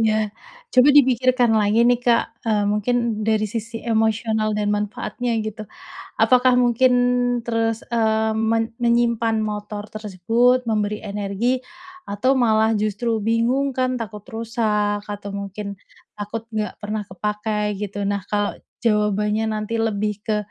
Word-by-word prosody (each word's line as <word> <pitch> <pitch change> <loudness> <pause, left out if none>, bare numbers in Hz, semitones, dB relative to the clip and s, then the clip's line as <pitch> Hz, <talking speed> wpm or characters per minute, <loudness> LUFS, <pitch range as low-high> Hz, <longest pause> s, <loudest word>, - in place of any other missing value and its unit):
Iya. 215 -1 +1 0.4
Coba 255 +2 +6
dipikirkan 255 -3 +4
lagi 215 +1 +3
nih 245 0 +3
Kak, 230 -1 +1
eee, 210 -2 +2
mungkin 215 +2 0
dari 215 -1 +2
sisi 225 +2 -5
emosional 220 -1 +1
dan 210 0 0
manfaatnya 215 +3 -2
gitu. 215 -1 -6 0.5
Apakah 250 0 +5
mungkin 245 +1 +3 0.5
terus, 225 -1 -1
eee, 220 -1 +1
men 225 +1 0
menyimpan 235 -1 +2
motor 210 -1 -4
tersebut, 225 +5 +1
memberi 210 -1 0
energi 210 +5 -2 0.4
atau 245 - 0
malah 220 -3 +3
justru 215 +2 -1
bingung 235 +5 +1
kan 255 0 0
takut 215 -2 -7
rusak 215 -3 -1
atau 205 -1 -6
mungkin 200 0 -6 0.4
takut 210 +2 -4
enggak 215 -1 -2
pernah 210 0 -3
kepakai 210 +3 -2
gitu? 205 0 -4
Nah 200 0 0
kalau 205 -1 -1 0.2
jawabannya 210 0 +1
nanti 215 +2 -3
lebih 210 -2 -1
ke 215 0 -1
220 Hz, 130 wpm, -22 LUFS, 210-235 Hz, 0.5 s, Coba